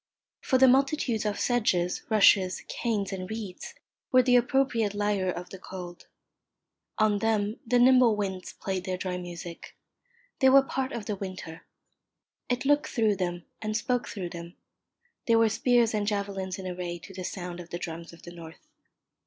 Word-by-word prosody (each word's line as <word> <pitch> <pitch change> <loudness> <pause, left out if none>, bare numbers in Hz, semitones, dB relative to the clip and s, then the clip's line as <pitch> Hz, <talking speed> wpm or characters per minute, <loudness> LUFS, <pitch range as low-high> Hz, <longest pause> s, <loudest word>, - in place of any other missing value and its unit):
For 260 - +2
the 265 0 +7
multitudes 260 -4 +2
of 205 - -2
sedges, 185 -8 +1
rushes, 200 -3 +4
canes, 210 -5 -2
and 185 0 -5
reeds 215 -4 -7 0.4
were 255 -1 +6
the 250 0 +4
appropriate 240 -4 +2
lyre 205 -2 0
of 180 0 -5
the 190 - -9
cold. 180 -2 -9 0.9
On 215 -2 +3
them 215 -1 0
the 245 +2 +3
nimble 250 -2 +6
winds 190 -3 -4
played 190 -2 -4
their 185 -2 -2
dry 180 -1 -3
music. 175 -1 -9 0.6
They 265 -3 +6
were 270 +1 +7
part 265 -1 -3
of 225 -3 -5
the 210 - -2
winter. 185 -4 -8 0.8
It 250 +2 -1
looked 290 +1 +3
through 220 -5 +1
them 175 -2 -3 0.2
and 215 0 -1
spoke 245 +2 -1
through 185 -5 -5
them. 170 +1 -9 0.7
They 230 - +5
were 225 -1 +4
spears 235 +1 +2
and 210 -1 -1
javelins 200 -3 -2
in 190 - -8
array 180 -1 -4
to 195 +3 -13
the 185 0 -6
sound 180 -1 -5
of 175 -1 -10
the 175 - -4
drums 170 -1 -7
of 170 - -16
the 175 - -9
north. 165 -2 -12
205 Hz, 170 wpm, -28 LUFS, 180-235 Hz, 0.9 s, the